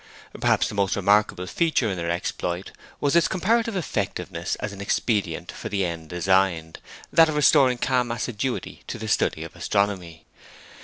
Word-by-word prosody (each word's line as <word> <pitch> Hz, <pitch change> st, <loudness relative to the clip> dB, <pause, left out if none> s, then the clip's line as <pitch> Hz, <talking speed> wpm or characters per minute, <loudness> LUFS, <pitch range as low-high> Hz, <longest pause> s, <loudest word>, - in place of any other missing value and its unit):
Perhaps -, -, +2 dB
the -, -, -6 dB
most 100 Hz, -2 st, +1 dB
remarkable 100 Hz, -2 st, +2 dB
feature 155 Hz, -, +1 dB
in -, -, -2 dB
their 85 Hz, -1 st, -3 dB
exploit 85 Hz, +1 st, -3 dB, 0.3 s
was 145 Hz, +2 st, +1 dB
its 170 Hz, -, +5 dB
comparative 225 Hz, +4 st, +1 dB
effectiveness 95 Hz, -, -3 dB
as 105 Hz, -1 st, -5 dB
an 100 Hz, -, -9 dB
expedient 105 Hz, 0 st, -1 dB
for -, -, -7 dB
the 100 Hz, -2 st, 0 dB
end 85 Hz, -2 st, -5 dB
designed, 90 Hz, -2 st, +1 dB, 0.3 s
that 165 Hz, -1 st, +6 dB
of 155 Hz, -, -2 dB
restoring 140 Hz, -4 st, +5 dB
calm 125 Hz, -1 st, +1 dB
assiduity 120 Hz, +2 st, -3 dB
to -, -, -5 dB
the 110 Hz, -1 st, -6 dB
study 105 Hz, -, +1 dB
of -, -, -10 dB
astronomy. 90 Hz, -6 st, -1 dB
100 Hz, 160 wpm, -24 LUFS, 90-130 Hz, 0.3 s, that